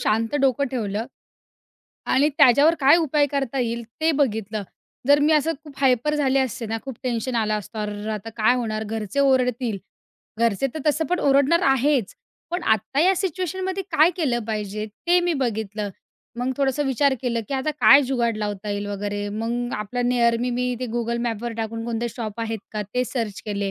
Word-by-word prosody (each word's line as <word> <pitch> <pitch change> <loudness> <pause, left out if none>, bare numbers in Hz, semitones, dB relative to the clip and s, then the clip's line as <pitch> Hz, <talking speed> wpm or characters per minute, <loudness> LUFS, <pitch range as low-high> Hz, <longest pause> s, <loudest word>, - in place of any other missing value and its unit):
शांत 225 +4 0
डोकं 270 0 +2
ठेवलं 225 -3 -2 1.0
आणि 280 +3 +4
त्याच्यावर 285 +4 +6
काय 275 +4 +7
उपाय 300 -3 +2
करता 275 -2 -2
येईल 235 -1 -1 0.2
ते 320 +1 +3
बघितलं. 220 -7 -1 0.5
जर 285 0 +7
मी 300 +2 +4
असं 310 +1 +3
खूप 295 - -11
हायपर 270 +2 +2
झाले 275 -2 +2
असते 250 -3 -2
ना, 225 +1 -2
खूप 265 -3 -7
टेन्शन 250 0 -2
आलं 215 -1 +1
असतं, 215 +2 -9
"अर्रर्र! 210 0 -4
आता 215 +1 -5
काय 220 +3 +4
होणार. 220 -3 -2
घरचे 220 +4 -3
ओरडतील." 250 -5 +1 0.6
घरचे 230 +2 +2
तर 310 - -4
तसं 300 +2 +2
पण 360 0 0
ओरडणार 280 +4 +4
आहेच, 270 -4 +2 0.4
पण 350 +1 -2
आत्ता 220 +6 +1
या 370 +4 +4
सिच्युएशनमध्ये 375 +1 -2
काय 320 +1 +5
केलं 275 -9 0
पाहिजे 215 -1 -3 0.2
ते 355 +1 +5
मी 350 0 +1
बघितलं. 215 -3 -2 0.5
मग 250 +2 -1
थोडंसं 275 +1 +1
विचार 270 +1 +2
केलं 235 -2 0
की 275 - -2
आता 265 +3 -1
काय 275 +1 +8
जुगाड 240 -4 0
लावता 205 -1 -4
येईल 205 0 -3
वगैरे 205 0 -3
मग 235 +4 -3
आपला 210 +4 -3
निअर 240 -1 +3
मी, 250 +1 -1
मी 250 0 -1
ते 250 - -2
Google 235 0 -1
Maps 235 +1 -3
टाकून 225 0 -4
कोणते 235 0 -2
शॉप 225 -1 -6
आहेत 225 -1 -2
का 215 -1 -2
ते 250 0 +2
सर्च 225 -6 -4
केले, 200 -1 -2
245 Hz, 180 wpm, -23 LUFS, 220-280 Hz, 1.0 s, काय